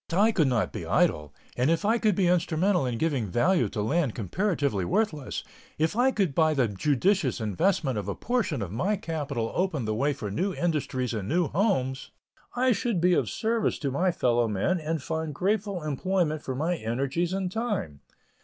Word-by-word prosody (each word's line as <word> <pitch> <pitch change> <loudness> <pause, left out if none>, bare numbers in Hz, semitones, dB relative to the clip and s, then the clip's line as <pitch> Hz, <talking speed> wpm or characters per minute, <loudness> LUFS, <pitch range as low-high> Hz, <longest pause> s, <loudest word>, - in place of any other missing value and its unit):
But 170 - -1
I 220 +2 +5
could 165 -9 +2
not 120 -7 0
be - - -5
idle, 75 -1 +1 0.2
and 125 +4 +1
if 165 +4 +1
I 225 +3 +3
could 215 -4 +2
be 190 - +2
instrumental 175 -2 +2
in 120 -2 -2
giving 140 -6 0
value 165 - +2
to 105 - -3
land 145 +1 0
comparatively 140 - -1
worthless; 155 - -1 0.3
if 160 +5 0
I 250 +3 +4
could 195 - 0
by 155 +1 +3
the 130 -4 +2
judicious 140 - +1
investment 130 - 0
of 100 - -6
a 100 - -2
portion 220 - -1
of 90 - -6
my 180 - 0
capital 145 - -3
open 170 -9 -1
the 110 - -1
way 140 +7 +1
for 105 -6 -5
new 185 - -1
industries 140 -7 -1
and 105 -4 -4
new 170 0 +1
homes, 135 - 0 0.5
I 255 +1 +3
should 235 -4 0
be 180 +2 +4
of - - +1
service 225 0 0
to 140 -3 -2
my 180 +8 +1
fellow 120 -8 +1
men 110 - 0
and 160 -2 -3
find 160 -2 -3
grateful 200 0 -1
employment 155 +1 0
for 130 - -4
my 165 +6 0
energies 135 +9 -1
and 190 -1 -2
time. 205 - -3
160 Hz, 190 wpm, -27 LUFS, 125-190 Hz, 0.5 s, I